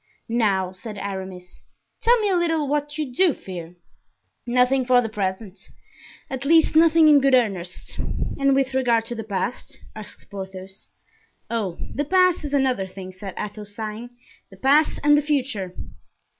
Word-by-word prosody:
"Now," 200 -6 +1
said 205 +3 -9
Aramis, 190 -2 -7 0.4
"tell 480 +1 +4
me 415 - +1
a 380 - +2
little 325 -4 +1
what 295 +1 -2
you 295 -5 -3
do 350 +1 +3
fear." 175 -2 -8 0.7
"Nothing 250 +2 +3
for 250 0 +4
the 230 -2 -1
present; 195 -1 -4 0.6
at 265 0 -5
least, 320 +2 +4
nothing 325 0 +6
in 295 -2 +7
good 270 -1 +5
earnest." 195 -8 -1
"And 275 -1 0
with 270 -1 +1
regard 240 -4 +2
to 240 - -5
the 225 - -5
past?" 205 +2 -4 0.2
asked 215 -1 -10
Porthos. 190 0 -8 0.6
"Oh! 210 -7 -2 0.2
the 290 - -1
past 365 +1 +3
is 290 -1 -5
another 255 -8 +1
thing," 185 0 -9
said 190 0 -8
Athos, 210 0 -6
sighing; 220 +2 -5 0.4
"the 195 - -15
past 285 +8 +3
and 295 0 +6
the 295 - +3
future." 260 -11 -2
240 Hz, 155 wpm, -23 LUFS, 195-285 Hz, 0.7 s, in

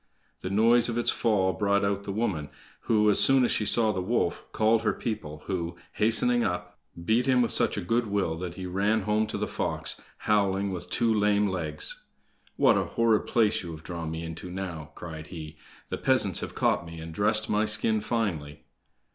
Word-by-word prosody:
The 95 - -5
noise 115 +4 +4
of 115 - -2
its 120 - +2
fall 95 -5 +1
brought 100 +3 +1
out 100 0 -1
the - - -3
woman, 95 -9 -2 0.4
who, 105 -2 +3
as 105 - +4
soon 135 -2 +5
as - - 0
she 105 - +1
saw 110 -2 +3
the 95 -3 -2
wolf, 110 +7 -1
called 110 +1 +2
her 110 - +1
people, 90 -10 -5
who, 85 -3 -3 0.2
hastening 115 +2 +3
up, 90 0 -3 0.3
beat 115 +7 +2
him 125 -2 +4
with 115 - -1
such - - +1
a - - -1
good 115 +4 +1
will 100 -5 0
that 90 -1 -5
he 95 - -6
ran 100 +4 +1
home 105 +2 +1
to - - -4
the - - -1
fox, - - -3 0.2
howling, 100 -2 +1
with 90 0 -6
two 115 -2 +1
lame 105 -1 +2
legs! 80 -5 -3 0.5
"What - - +4
a - - -1
horrid 115 -2 +1
place 110 -3 +2
you 90 - -7
have 80 0 -10
drawn 85 +1 -5
me 80 +1 -5
into 80 +2 -7
now," 90 -5 -6
cried 80 -2 -8
he; 80 -3 -9 0.3
"the - - -4
peasants - - +2
have - - -6
caught - - +1
me, 85 -1 -9
and 80 0 -8
dressed 105 +4 +2
my 105 +1 +1
skin 110 0 +2
finely!" 85 -11 -3
100 Hz, 200 wpm, -27 LUFS, 85-110 Hz, 0.5 s, soon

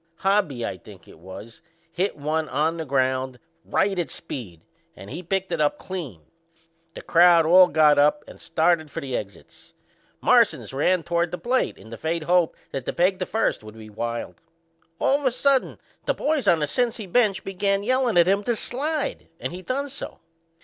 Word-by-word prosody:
Hobby, 180 - 0
I 95 - -5
think 95 +1 -15
it - - -16
was, 100 +5 -11 0.3
hit 185 0 -2
one 155 +2 -2
on 155 +4 0
the 160 - -4
ground 130 -1 0 0.3
right 195 -1 0
at 175 - -2
Speed 105 - -7 0.3
and 100 - -11
he 175 - -5
picked 190 +2 -2
it - - -1
up 150 - +1
clean. 155 - -7 0.7
The - - -8
crowd 170 -1 +5
all 180 +3 +7
got 150 -2 +4
up 150 +1 +3
and - - -13
started 165 -1 +1
for - - -5
the 130 -2 -4
exits. 100 -4 -9 0.4
Marsans - - +3
run 170 +6 +1
toward 170 0 0
the 180 - -5
plate 245 +9 -1
in 110 - -15
the 115 - -7
faint 160 +3 -2
hope 175 0 +2 0.2
that 135 -2 -5
the - - -3
peg 185 +2 +1
to 185 - -3
first 225 - -1
would 110 +1 -12
be 110 -1 -11
wild. 115 +2 -5 0.6
All 275 +9 +2
of 290 - -7
a - - +2
sudden 270 +2 +1 0.3
the - - +1
boys 300 -2 -1
on 170 - +5
the 150 - 0
Cincy 235 - -1
bench 200 +1 +1
begun 195 +1 -1
yellin' 255 -2 +1
at 170 0 +6
him 200 +2 +2
to 240 - +1
slide, 290 +7 -1
and - - -4
he 180 - -7
done 270 +7 -3
so. 275 +1 -8
170 Hz, 190 wpm, -24 LUFS, 135-200 Hz, 0.7 s, all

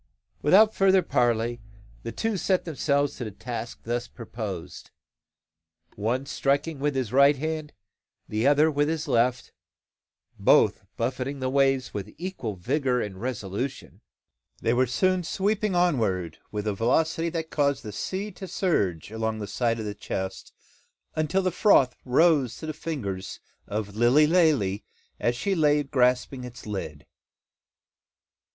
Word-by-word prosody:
Without 210 +8 +6
further 190 -1 +4
parley, 120 0 +1 0.4
the 115 - -5
two 225 - -1
set 185 0 +1
themselves 145 -2 0
to - - -4
the 110 - -4
task 115 +3 -6
thus 120 +1 -2
proposed; 110 -7 -7 1.0
and - - -29
one 120 +6 0
striking 140 +2 0
with 145 0 0
his 125 -4 -2
right 140 +2 +6
hand, 155 +1 -4 0.6
the 110 +4 0
other 150 +2 +5
with 145 +1 +1
his 160 -1 -2
left, 125 +2 +1 0.9
both - - +4 0.2
buffeting 135 +2 -2
the 130 0 -1
waves 135 -2 +2
with 100 +1 -6
equal 170 - -4
vigour 130 - 0
and 95 -4 -5
resolution, 120 0 -4 0.6
they 115 - +1
were 130 +1 +3
soon 185 +9 +1
sweeping 200 +3 0
onward 110 - +1
with 105 -1 -3
a 105 - 0
velocity 160 - +1
that 160 -1 -4
caused 140 -2 +1
the 105 - -6
sea 195 - -4
to 190 +1 -9
surge 105 - -1
along 110 0 -2
the 105 - -4
sides 115 +3 -1
of - - -5
the 105 - -3
chest, 95 -2 -5 0.6
until 155 +5 +1
the 185 - +1
froth 150 - +4
rose 135 -2 +3
to - - -8
the 155 - -3
fingers 105 - -5 0.3
of 105 -1 -4
Lilly 120 +7 +5
Lalee 150 - +2 0.4
as 120 - +1
she 195 +11 -1
lay 150 -4 +3
grasping 125 -1 +1
its 125 -1 -10
lid! 85 -8 -5
130 Hz, 145 wpm, -26 LUFS, 110-155 Hz, 1.0 s, Without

